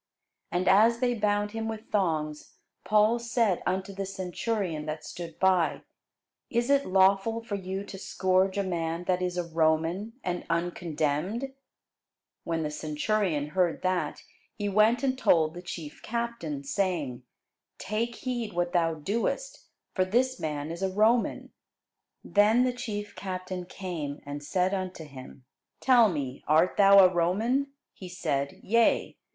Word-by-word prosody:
And 180 +1 0
as 220 +5 +6
they 245 0 +1
bound 205 -2 0
him 225 0 -3
with 220 0 -7
thongs, 155 -6 -1 0.3
Paul 215 +2 +3
said 230 -5 +1
unto 190 +1 -1
the 195 0 -4
centurion 185 -3 -3
that 155 0 -5
stood 170 -2 -8
by, 185 -3 +2 0.7
Is 240 +3 0
it 280 0 +3
lawful 195 +4 +3
for 220 - -7
you 190 0 -3
to 195 -1 -9
scourge 190 +1 +1
a 200 - +1
man 170 -2 -2
that 180 0 0
is 180 -1 -2
a 175 - 0
Roman, 165 +5 0
and 180 -1 -2
uncondemned? 170 - -1 0.9
When 165 -1 -1
the 150 - -2
centurion 155 +1 -1
heard 180 0 0
that, 185 -4 -1 0.3
he 205 -2 -3
went 215 +5 +3
and 260 -1 +1
told 160 -11 +3
the 175 - -8
chief 165 -4 -8
captain, 235 -11 -3
saying, 145 -4 -1 0.6
Take 225 +4 -2
heed 240 -5 -4
what 175 0 -1
thou 165 -2 +2
doest: 230 - -3 0.3
for 185 - +2
this 250 +7 +1
man 150 0 -3
is 170 +2 -6
a 190 - +1
Roman. 220 +5 +1 0.7
Then 215 +4 +4
the 255 -1 +1
chief 210 -4 -5
captain 185 -1 -5
came, 165 -7 -5
and 145 +1 -6
said 180 +5 0
unto 185 -3 -4
him, 130 -2 -12 0.3
Tell 245 -4 +5
me, 140 -6 -4
art 160 +4 +4
thou 195 -1 +8
a 180 - +3
Roman? 225 +11 +1 0.2
He 185 - -10
said, 140 -6 -2
Yea. 230 +2 +2
185 Hz, 145 wpm, -28 LUFS, 165-215 Hz, 0.9 s, thou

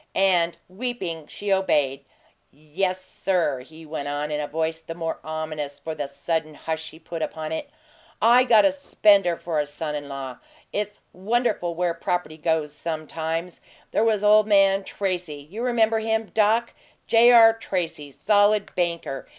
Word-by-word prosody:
And, 175 -3 +3
weeping, 185 -7 -5
she 205 -1 -2
obeyed. 145 -8 +1 0.4
"Yes, 185 +6 -3
sir," 175 -8 0
he 160 +5 -13
went 150 -2 -5
on, 145 +1 -3
in 150 0 -1
a 145 - -3
voice 160 +1 -2
the 165 0 -8
more 165 -1 -3
ominous 155 -2 -4
for 160 - -6
the 150 -2 -4
sudden 155 +2 -3
hush 160 +1 -4
he - - -14
put 165 0 -7
upon 155 0 -4
it. 280 - -4 0.5
"I 240 +3 +6
got 230 -2 +5
a 295 - +5
spender 200 -10 +3
for 165 -3 -2
a 145 - -1
son 150 +1 -4
in 145 -1 -5
law! 135 -2 -6 0.3
It's 210 0 -3
wonderful 205 -3 -1
where 175 0 0
property 170 -2 -3
goes, 155 -2 0
sometimes. 160 +2 -4 0.3
There 215 - +2
was 215 -2 +2
ole 210 +1 +7
man 195 -2 +3
Tracy 180 -8 -4
you 220 +4 -5
remember 225 -2 +2
him, 220 0 -1
Doc 225 +2 +2 0.3
J. 235 +1 +6
R. 225 -2 +8
Tracy, 175 -9 -4
solid 205 +6 +2
banker. 170 -6 -2
170 Hz, 160 wpm, -24 LUFS, 155-210 Hz, 0.5 s, R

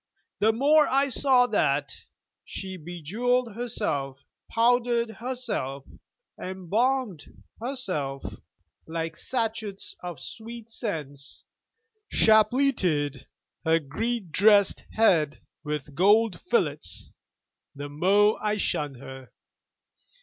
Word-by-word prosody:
The 220 +2 +4
more 290 +6 +4
I 275 +1 +2
saw 255 -1 +4
that - - 0 0.4
she 190 -1 -6
bejewelled 205 +9 -1
herself, 155 - -3 0.2
powdered 235 0 +2
herself, 225 - -4 0.6
embalmed 200 - -2 0.2
herself 185 - -3 0.6
like 165 0 -3
sachets 220 -1 -3
of 175 -5 -6
sweet 230 - -9
scents, 145 - -5 0.7
chapleted 215 - +3 0.4
her 160 0 +4
Greek 190 - -3
dressed 200 +3 +4
head 165 -9 +3 0.2
with 150 -2 -4
gold 205 +5 +3
fillets, 465 +6 -1 0.6
the 145 +1 -6
more 195 +8 +3
I 210 0 +1
shunned 145 -8 -1
her. 130 0 -10
205 Hz, 90 wpm, -26 LUFS, 150-235 Hz, 0.7 s, The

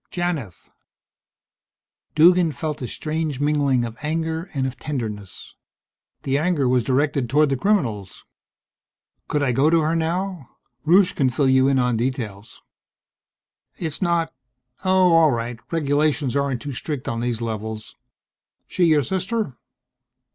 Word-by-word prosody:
"Janith." 165 - -4 1.4
Duggan 170 +1 +5
felt 155 -2 -4
a 125 - -3
strange 155 0 -3
mingling 145 -4 +2
of 115 -1 -8
anger 160 +3 -2
and 135 -1 0
of 130 -1 -3
tenderness. 110 -9 -6 0.7
The 135 +1 +1
anger 155 -5 +1
was 125 -1 +2
directed 140 0 0
toward 150 +3 +3
the - - +2
criminals. 125 - -1 1.0
"Could 150 -1 0
I 130 - +2
go 135 +5 +3
to 165 0 +4
her 160 +2 0
now? 170 -2 -2 0.4
Rusche 180 +2 +5
can 135 -2 +2
fill 135 +2 +1
you 130 0 +4
in 135 -1 +3
on 125 -2 +1
details." 115 -4 -4 1.1
"It's 160 0 -4
not 170 -3 +1 0.5
oh, 185 -2 +4
all 165 -1 +6
right. 120 -2 -3
Regulations 145 -3 0
aren't 140 -3 -1
too 145 -2 -5
strict 140 +1 -5
on 115 - -2
these 120 -1 -1
levels. 110 -1 -5 0.7
She 180 - +1
your 155 -3 +4
sister?" 190 - -2
145 Hz, 135 wpm, -22 LUFS, 125-165 Hz, 1.4 s, all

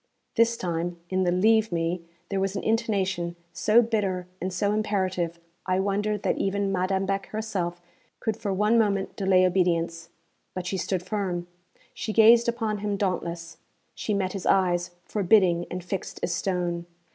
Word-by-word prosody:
_' - - -47
This 230 0 +3
time, 175 -1 -2
in 185 0 +1
the 175 - +2
'leave 220 +4 +3
me' 170 +1 -1 0.3
there 195 - -1
was 195 +1 -1
an 195 - -3
intonation 195 -6 0 0.2
so 225 +2 +4
bitter 200 -5 -1 0.2
and 185 +2 -2
so 200 +3 0
imperative, 185 -5 -1 0.3
I 185 0 +2
wondered 205 +1 0
that - - 0
even 195 0 0
Madame 190 +1 0
Beck 195 0 -2
herself 195 -6 -3 0.4
could 220 -2 -1
for 205 -2 -3
one 210 +4 +3
moment 200 -3 0
delay 190 -1 +4
obedience. 170 -2 0 0.5
But 185 -1 -4
she 190 +2 -2
stood 185 -1 -1
firm; 185 -3 -2 0.5
she 220 - -4
gazed 230 +2 +6
upon 225 -3 -1
him 205 0 -2
dauntless; 170 -3 -3 0.4
she 210 - -2
met 185 -2 -1
his 195 -3 -4
eyes, 180 -2 +2 0.2
forbidding 185 -4 +3
and 180 0 -5
fixed 190 +2 -5
as - - 0
stone. 175 -2 -1
190 Hz, 165 wpm, -26 LUFS, 180-210 Hz, 0.5 s, gazed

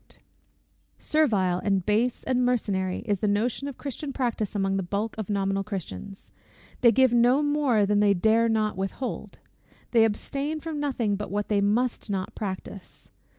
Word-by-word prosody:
Servile, 205 - +1
and 195 -3 +1
base, 225 +4 +1
and 250 -1 +1
mercenary, 200 -7 0
is 205 -4 0
the 210 - 0
notion 225 +7 0
of 280 - -7
Christian 280 +1 -5
practice 235 -6 -2
among 195 -1 0
the - - 0
bulk 200 +4 -3
of 215 -3 -5
nominal 195 -1 0
Christians. 195 - -7 0.5
They 235 -3 +6
give 260 +1 +4
no 245 +4 +4
more 290 -8 +2
than 205 +1 +2
they 205 -1 +4
dare 220 +5 +3
not 215 -1 +1
with 195 0 -3
hold; 260 - -6 0.5
they 230 -2 +5
abstain 280 +8 -1
from 315 -1 -5
nothing 245 -8 -1
but 210 - -5
what 205 +1 -2
they 205 -2 +2
must 225 +4 0
not 190 -2 -3
practise. 195 -1 -7
215 Hz, 165 wpm, -26 LUFS, 200-250 Hz, 0.5 s, They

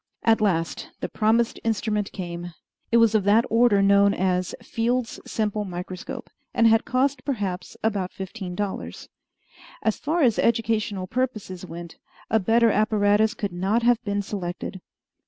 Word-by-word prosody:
At 225 -1 +4
last 165 -6 0
the - - -3
promised 225 +2 +1
instrument 210 -2 -1
came. 175 -2 -6 0.4
It 235 - +5
was 230 -1 +5
of 215 -2 +3
that 215 +3 +5
order 230 -3 +4
known 200 0 +5
as 185 -1 0
Field's 235 +1 -1
simple 210 -1 -1
microscope, 180 -1 -7 0.2
and 230 - +4
had 225 0 +5
cost 260 +1 0
perhaps 195 -9 -3
about 200 -4 0
fifteen 190 -1 -6
dollars. 205 -1 -5 0.7
As 220 - +1
far 315 +2 0
as 235 -4 +3
educational 215 -4 +1
purposes 205 -5 -3
went, 170 0 -9 0.3
a 220 - +4
better 225 +3 +4
apparatus 215 0 +2
could 200 -4 -3
not 195 +6 0
have 240 0 +3
been 200 -2 -1
selected. 190 -1 -5
210 Hz, 145 wpm, -24 LUFS, 190-230 Hz, 0.7 s, It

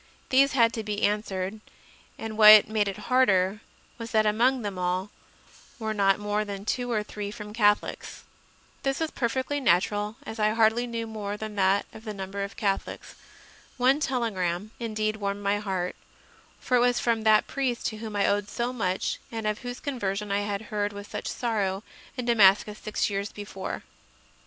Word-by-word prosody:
These 275 +1 +4
had 230 -3 +4
to 225 - -3
be 210 0 -3
answered, 205 -1 -1 0.6
and 220 -1 -6
what 215 -1 +9
made 215 -1 +1
it 195 - -3
harder 210 -5 +3 0.4
was 230 0 -6
that 215 -1 +3
among 240 +4 +2
them 200 -3 -4
all 180 +2 -1 0.7
there 225 - -7
were 220 - 0
not 195 -2 +3
more 210 0 -1
than 200 -1 -6
two 245 +2 -1
or 215 -2 0
three 210 -1 -6
from 210 -1 -8
Catholics. 210 -2 0 0.6
This 270 0 -1
was 320 -1 -1
perfectly 260 +3 -1
natural, 205 0 +1
as 220 - -7
I 215 0 +2
hardly 225 +2 +3
knew 230 -1 -3
more 210 -2 -5
than 215 0 -6
that 195 +1 +3 0.2
number 200 -2 -5
of 200 - -7
Catholics. 200 -3 -2 0.6
One 260 +3 +4
telegram 215 - -1
indeed 215 -2 -2
warmed 200 -1 -3
my 200 +1 +1
heart; 190 -3 -2 0.6
for 250 - +1
it - - +3
was 245 0 +3
from 230 -2 +1
that 215 -1 +5
priest 260 -3 -2
to 220 - -8
whom 215 -1 -6
I 200 - +2
owed 205 0 +1
so 240 +3 -2
much 190 -6 -1
and 225 -2 -4
of 210 0 -1
whose 245 0 -6
conversion 210 -7 -3
I 200 - +2
had 205 0 -3
heard 205 0 -1
with 205 0 -9
such - - -4
sorrow 205 -5 -1 0.3
in 250 - -3
Damascus 210 -2 +4
six 215 - -1
years 200 +1 -2
before. 200 -2 -6
210 Hz, 175 wpm, -27 LUFS, 200-230 Hz, 0.7 s, what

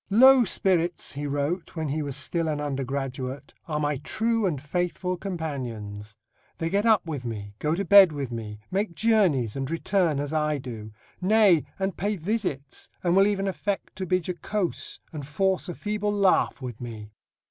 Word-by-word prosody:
"Low 255 +4 +7
spirits," 175 -3 +1
he 145 +1 -4
wrote, 145 +7 -2
when 160 -3 -2
he 155 +3 -1
was 140 -3 -4
still 165 +5 0
an 150 -2 -1
undergraduate, 135 -1 -4
"are 150 -2 -1
my 145 -1 0
true 225 - 0
and 150 -7 -1
faithful 180 +4 -2
companions; 120 - -5 0.4
they 165 0 -2
get 205 +3 +2
up 220 -5 +4
with 150 -6 -4
me, 105 -4 -5
go 155 +2 +1
to 200 +3 -2
bed 195 -1 +8
with 140 -4 -4
me, 110 -3 -5
make 195 -2 -1
journeys 180 - +2
and 135 -1 -3
return 165 -2 +1
as 145 +1 -3
I 150 -1 +1
do; 115 -5 -7 0.3
nay, 195 -4 +5
and 190 -2 -1
pay 205 +4 0
visits, 175 -7 -3
and 175 0 +2
will 195 +1 +6
even 200 -1 0
affect 195 +1 -3
to 190 -1 -3
be 185 - +3
jocose, 180 +2 -3
and 150 -2 -5
force 185 +7 0
a 175 - -4
feeble 210 0 -2
laugh 200 -8 +2
with 120 -3 -6
me." 110 -3 -7
160 Hz, 175 wpm, -26 LUFS, 135-195 Hz, 0.4 s, bed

